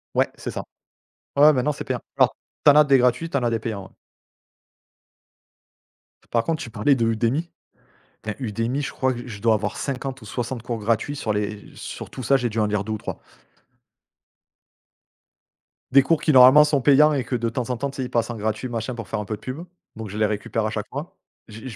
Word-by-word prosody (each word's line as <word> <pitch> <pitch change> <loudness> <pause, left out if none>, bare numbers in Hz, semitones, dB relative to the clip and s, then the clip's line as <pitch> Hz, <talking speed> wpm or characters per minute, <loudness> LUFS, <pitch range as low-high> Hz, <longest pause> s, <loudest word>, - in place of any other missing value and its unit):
Ouais - - +3
c'est - - -6
ça. - - -5 0.7
Ouais, 140 - +4
ouais, 155 - +8
maintenant 140 +2 +1
c'est - - -7
payant. - - -3 0.2
Alors, - - +4 0.3
tu - - +9
en 145 - +6
as 150 - +8
des 140 -2 +5
gratuits, 125 +6 +2
tu 140 - -2
en 135 - 0
as 120 - +1
des 115 - 0
payants, 105 -4 -4
ouais - - -15 2.4
par 115 -1 +2
contre, 160 +3 -2
tu - - -6
parlais 115 +5 +2
de 115 -3 +1
Udemy, 115 +9 0 0.7
putain, 110 - -3
Udemy 120 +3 -2
je 145 - -4
crois, 130 -1 0
j 120 - -7
je 100 -5 -8
dois 115 -1 +4
avoir 105 -1 -2
50 135 -1 -4
ou - - -11
60 120 +1 -4
cours 115 -1 -4
gratuits 115 +7 -1
sur 115 -7 -1
les 105 0 -3
sur - - -8
tout 130 - -7
ça, 135 +4 +4
j'ai 125 -2 -1
dû 110 - -4
en 105 - +3
lire 105 -1 -1
2 110 - -4
ou 110 - -2
3. - - -6 2.7
Des 135 +1 +7
cours 160 +3 +1
qui 155 - +2
normalement 130 +3 +9
sont 150 -3 +1
payants 150 +3 +5
et 135 -3 0
que, 125 +2 -3
de 115 -1 -1
temps 120 +1 -4
en 125 - -2
temps, 140 +4 -2
tu 135 - -11
sais, 130 - -2
ils 125 - -6
passent 115 0 0
en 120 - -4
gratuit, 110 +4 -2
machin, 115 +1 -3
pour 115 -1 -7
faire - - -3
un 105 - -4
peu 110 - -3
de - - -15
pub 145 +7 -6 0.3
donc 110 -1 -6
je 105 - -7
les 110 - +3
récupère 110 +1 -2
à - - 0
chaque 110 -1 -4
fois, 145 +5 -7 0.3
j'ai 110 +3 -10
j 120 - -7
120 Hz, 235 wpm, -23 LUFS, 110-135 Hz, 2.7 s, tu